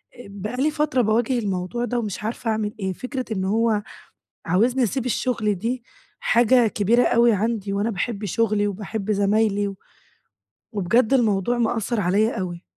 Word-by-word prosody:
آآ 245 - -11
بقى 205 +5 -6
لي 300 +3 +2
فترة 300 -4 +1
باواجه 235 +3 +1
الموضوع 195 +3 -2
ده 245 0 -1
ومش 210 -3 -4
عارفة 225 +1 -2
أعمل 215 -1 -2
إيه، 190 -2 -2
فكرة 255 +5 -5
إن 190 -2 -2
هو 215 +1 +1 0.6
عاوزني 235 +9 +2
أسيب 245 +3 -1
الشغل 225 -3 0
دي 235 +6 -3 0.4
حاجة 240 0 +4
كبيرة 220 +4 +2
أوي 235 0 +4
عندي، 210 -1 -1
وأنا 200 +3 0
باحب 210 +1 -3
شغلي 210 +1 +1
وباحب 205 +1 -4
زمايلي 205 0 +2
و 195 -1 -7 0.9
وبجد 220 +4 +2
الموضوع 230 -2 +2
مأثر 230 -1 0
عليَّا 210 +5 +1
أوي. 175 -2 -5
220 Hz, 155 wpm, -23 LUFS, 200-240 Hz, 0.9 s, حاجة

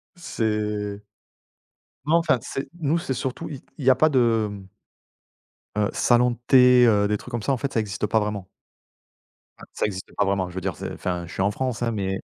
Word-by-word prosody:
C'est 105 - -2 1.0
non, 160 +3 +3
enfin, 160 -6 +3
c'est 135 - -5
nous, 160 +2 +1
c'est 135 -6 -3
surtout 130 +1 -4
i 140 -4 -8 0.2
il 135 - -5
y 130 - +6
a - - +7
pas 155 - +4
de, 115 -6 +2
hem 100 -2 -9 1.1
heu, 105 -1 +1
salons 125 0 +3
de 120 - -6
thé, 125 -2 +7
heu, 100 -2 +3
des 105 0 0
trucs - - -12
comme 115 -3 -3
ça, 140 - 0
en 130 - +1
fait, 140 +2 -4
ça 115 - +2
existe 105 0 -2
pas 110 - +2
vraiment. 105 -3 -3 1.1
Enfin, - - -12
ça - - -1
existe 95 -3 -5
pas 100 - +2
vraiment, 95 -2 0
je 90 - -13
veux 95 - -3
dire 90 -2 -3
c'est - - -6
enfin, 90 -1 -3
je - - -10
suis - - -3
en 100 +1 +2
France, 125 +1 -3
hein, 115 - 0
mais 95 -3 -2
110 Hz, 220 wpm, -24 LUFS, 100-130 Hz, 1.1 s, a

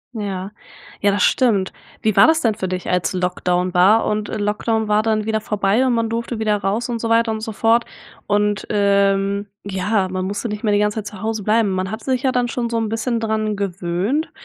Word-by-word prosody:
Ja, 195 -2 -4 0.5
ja 200 - +3
das 200 - +1
stimmt. 210 -7 +2 0.3
Wie 215 -2 +1
war - - +7
das 320 0 +3
denn 225 -3 +2
für 205 -3 -4
dich 185 0 -4
als 180 +2 0
Lockdown 180 0 -1
war? 195 +5 +5
Und 210 0 -1
Lockdown 215 +1 -1
war 210 0 +3
dann 215 -1 0
wieder 220 0 -1
vorbei 210 +3 +1
und 250 - +2
man 230 -1 +1
durfte 230 0 -3
wieder 215 -1 +1
raus 205 +5 -1
und 235 -1 -3
so 230 - -2
weiter 230 0 +3
und 220 - -3
so 220 0 -4
fort? 225 +2 +2 0.4
Und, 205 0 0
ähm, 200 0 +2 0.2
ja, 195 0 0
man 185 0 -3
musste 205 +4 -3
nicht 210 +1 -5
mehr 210 -2 +2
die 205 - +3
ganze 210 +1 0
Zeit 205 - -6
zu 185 - -11
Hause 220 0 -2
bleiben. 215 0 +2
Man 185 0 -2
hat 220 +2 -6
sich 260 -2 0
ja 260 - +2
dann 245 -1 +1
schon 235 0 -3
so 230 - -1
ein 225 -1 -2
bisschen 230 +1 -1
dran 215 -1 -1
gewöhnt, 195 - -2
210 Hz, 225 wpm, -20 LUFS, 195-225 Hz, 0.5 s, war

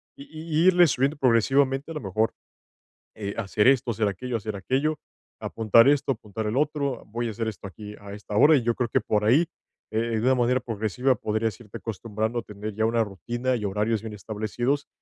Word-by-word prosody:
y - - -10
y 160 +1 0
irle 180 -1 +7
subiendo 135 +2 +1
progresivamente, 135 +3 +2
a - - -4
lo 150 - -4
mejor, 110 +2 0 0.8
eh, 100 -2 -4
hacer 105 0 +1
esto, 130 -2 +4
hacer 110 -1 0
aquello 115 +5 -3
hacer 110 -1 -5
aquello, 140 +9 -1 0.4
apuntar 115 +2 +4
esto, 140 -1 +3
apuntar 110 -1 -6
el 110 +4 -1
otro, 140 -3 -1
voy 115 +3 -3
a - - -3
hacer 115 +1 -3
esto 105 -2 -6
aquí 105 +2 -10
a 100 0 -10
esta 105 0 -7
hora, 150 +9 +7
y 125 - -1
yo 120 0 +1
creo 120 -2 -1
que - - +2
por 105 -1 0
ahí, 145 +10 +4 0.4
eh, 110 - -2 0.2
de - - -3
una 130 +3 +3
manera 125 +1 +2
progresiva, 120 +2 0
podrías 110 0 -2
irte 105 -4 -9
acostumbrando 110 +1 -3
a - - -7
tener 105 +1 -7
ya 110 +2 0
una 115 +1 +2
rutina 120 +5 -2
y 115 - -4
horarios 105 +2 0
bien 110 -1 -7
establecidos 110 +7 -2
115 Hz, 205 wpm, -25 LUFS, 105-130 Hz, 0.8 s, irle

